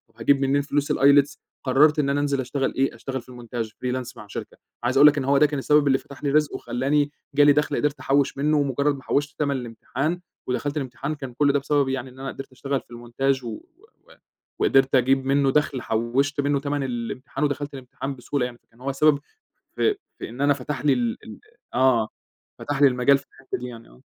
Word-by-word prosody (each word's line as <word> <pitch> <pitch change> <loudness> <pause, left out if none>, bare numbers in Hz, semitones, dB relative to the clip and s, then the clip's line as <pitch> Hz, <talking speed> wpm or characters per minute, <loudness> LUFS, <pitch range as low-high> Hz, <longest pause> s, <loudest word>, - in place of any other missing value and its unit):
هاجيب 140 -1 +2
منين 140 +1 +2
فلوس 145 0 -1
الILETS 140 0 +4 0.3
قررت 150 +4 +4
إن 140 -2 +1
أنا 140 +1 +1
أنزل 140 -1 0
أشتغل 135 +1 -2
إيه 135 +1 0
أشتغل 130 -1 -5
في 120 - -21
المونتاج 120 -2 -5
freelance 125 +1 -4
مع 105 - -10
شركة، - - -7 0.3
عايز 125 +2 +1
أقول 145 +2 +9
لَك 150 0 +4
إنّه 135 -2 -1
هو 140 - +5
ده 150 - +6
كان 145 -1 -1
السبب 150 +1 +3
اللي 135 - +4
فتح 140 +1 -13
لي 145 - +1
رزق 150 0 +2
وخلّاني 145 +4 0 0.2
جالي 145 0 +7
دخل 150 +1 +1
قدرت 150 0 0
أحوّش 140 0 +1
منّه، 150 +1 +2
مجرد 140 +1 0
ما 135 - -11
حوّشت 145 +1 -1
تمن 140 -2 +1
الامتحان 130 +7 -3 0.3
ودخلت 140 +4 -2
الامتحان 135 +2 -3
كان 135 -4 -8
كل 140 +2 +2
ده 145 - +3
بسبب 140 0 +1
يعني 130 -1 -3
إن 130 +1 -16
أنا 135 - -5
قدرت 135 - -8
أشتغل 135 +1 -3
في - - -28
المونتاج 125 +3 -1
و 120 - -6 1.0
وقدرت 135 0 +3
أجيب 130 +1 +3
منّه 135 0 +3
دخل 145 -3 +1
حوّشت 125 +6 0
منّه 140 0 +1
تمن 145 0 -2
الامتحان 125 +2 -4
ودخلت 145 0 -1
الامتحان 135 +1 -6
بسهولة 125 +1 -2
يعني، 120 -1 -7
فكان 115 +2 -25
هو 140 +1 -2
سبب 145 +1 +3 0.6
في 425 - +2 0.2
في - - -6
إن 120 +4 -7
أنا 145 0 +4
فتح 140 +1 -5
لي 145 - +5
ال 240 0 -1
ال - - -10 0.4
-آه، 125 -3 +3 0.5
فتح 145 -1 -3
لي 140 - +9
المجال 130 +2 +4
في 140 - -14
الحتّة 135 0 -6
دي 125 - -6
يعني 115 -2 -11
آه. - - -20
135 Hz, 210 wpm, -24 LUFS, 130-145 Hz, 1.0 s, أقول